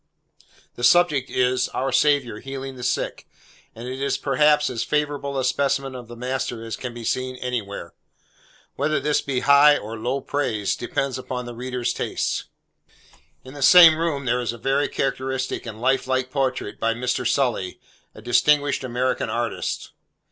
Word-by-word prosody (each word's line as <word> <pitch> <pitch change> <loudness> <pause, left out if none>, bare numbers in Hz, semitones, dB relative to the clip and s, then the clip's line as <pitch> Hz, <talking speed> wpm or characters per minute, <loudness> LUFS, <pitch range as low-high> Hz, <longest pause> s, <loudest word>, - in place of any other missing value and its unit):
The 120 - -7
subject 150 -1 +4
is, 125 0 +1
our 135 +1 -1
Saviour 140 -7 +2
healing 135 +1 -7
the 125 - -10
sick, 125 - -2 0.5
and 115 +2 -8
it 130 +1 -5
is, 140 -1 0
perhaps, 150 +2 +3
as 120 -3 -2
favourable 145 -2 -1
a 130 - 0
specimen 135 +1 0
of 125 -2 -9
the 120 - -10
master 125 -1 -3
as 115 - -4
can 125 - -6
be 120 0 -9
seen 130 +2 -2
anywhere. 115 -8 -5 0.8
Whether 150 +3 0
this 150 0 +1
be 130 -2 -2
high 140 +2 +6
or 110 +2 -7
low 125 +5 -1
praise, 125 -7 -1
depends 130 +1 -2
upon 125 -1 -5
the 120 - -7
reader's 125 0 -3
taste. - - -2 1.0
In 130 - -11
the 145 - -9
same 170 +2 +9
room, 155 -4 -2
there 125 0 +1
is 120 -1 -2
a - - -9
very 135 +4 +1
characteristic 130 -2 -2
and 110 -1 -7
life 130 +2 +1
like 130 0 -1
portrait 130 -6 -2
by 115 0 +1
Mr. 125 +1 -1
Sully, 120 -9 0 0.4
a 110 - -12
distinguished 145 +4 +2
American 130 +1 -1
artist. 120 0 -3
130 Hz, 165 wpm, -23 LUFS, 120-140 Hz, 1.0 s, same